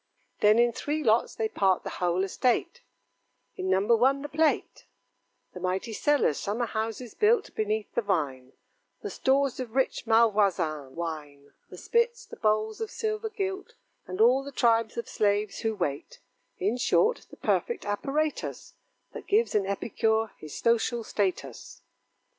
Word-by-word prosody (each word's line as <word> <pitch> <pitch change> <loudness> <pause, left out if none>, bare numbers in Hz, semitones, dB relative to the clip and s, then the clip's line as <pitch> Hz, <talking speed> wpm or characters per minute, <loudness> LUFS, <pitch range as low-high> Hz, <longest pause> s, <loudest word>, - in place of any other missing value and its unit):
Then 210 +1 +5
in 240 0 +4
three 300 +6 -2
lots 225 -1 +2
they 220 - 0
part 190 -3 +1
the - - -5
whole 180 +1 +1
estate: 255 - 0 0.7
In 185 - -3
number 195 +5 +3
one 270 +4 +2
the 295 - -5
plate; 315 0 0 0.7
The 180 - -8
mighty 185 +5 -2
cellars; 285 - +2
summer 220 +4 -1
houses 225 +1 -4
built 435 0 +2
Beneath 215 -1 -2
the - - +1
vine; 140 - -2 0.5
The 415 - -4
stores 270 -1 +1
of 245 -2 -6
rich 265 -2 0
Malvoisin 195 - +2
wine; 150 -4 -6 0.2
The - - -11
spits, 470 0 0
the - - -12
bowls 215 - 0
of 445 - -3
silver 435 0 -3
gilt, 390 -2 -4 0.3
And 185 +1 -6
all 250 +4 +5
the 280 - -8
tribes 230 -3 +2
of 235 - -3
slaves 205 0 0
who 220 -1 -1
wait; 145 -7 -4 0.4
In 210 +6 0
short, 445 - +2
the - - -14
perfect 475 - -1
apparatus, 280 +9 -2 0.4
That - - -9
gives 440 +3 +2
an 200 -2 +1
epicure 220 +2 0
his 155 -1 -8
social 235 0 +1
status. 185 - -3
220 Hz, 150 wpm, -27 LUFS, 195-275 Hz, 0.7 s, Then